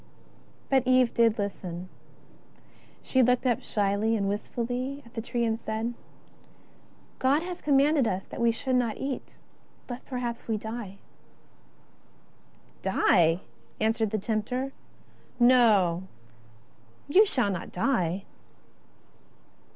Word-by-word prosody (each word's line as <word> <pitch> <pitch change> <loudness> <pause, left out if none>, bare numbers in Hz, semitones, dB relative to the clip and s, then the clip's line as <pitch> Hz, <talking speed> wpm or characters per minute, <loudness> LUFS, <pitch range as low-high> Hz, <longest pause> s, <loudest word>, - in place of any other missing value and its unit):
But 265 -2 +2
Eve 255 -2 +4
did 230 -2 +3
listen. 185 -3 -4 1.2
She 260 - +2
looked 250 +1 +3
up 245 -3 +2
shyly 205 +2 0
and 200 -1 -1
wistfully 245 +6 -3
at 235 - -17
the 225 - -3
tree 235 +1 -1
and 225 0 -1
said: 220 0 -3
^' 240 - -2 1.3
God 280 +5 +2
hath 355 0 -6
commanded 285 -2 +3
us 190 -1 -2
that - - -7
we 235 - +4
should 255 +3 -1
not 235 -3 0
eat, 270 -1 -5 0.5
lest 245 0 -8
perhaps 245 -3 -4
we 220 -2 0
die." 220 -2 -6 0.9
" - - -32
Die! 170 0 +3 0.2
" - - -32
answered 220 0 +1
the 215 - -1
tempter, 235 +6 -2 0.4
" 255 - -30
no, 210 -8 +4 1.0
you 365 +9 +6
shall 250 - +1
not 180 -3 -5
die." 185 -4 0
235 Hz, 125 wpm, -27 LUFS, 205-255 Hz, 1.3 s, you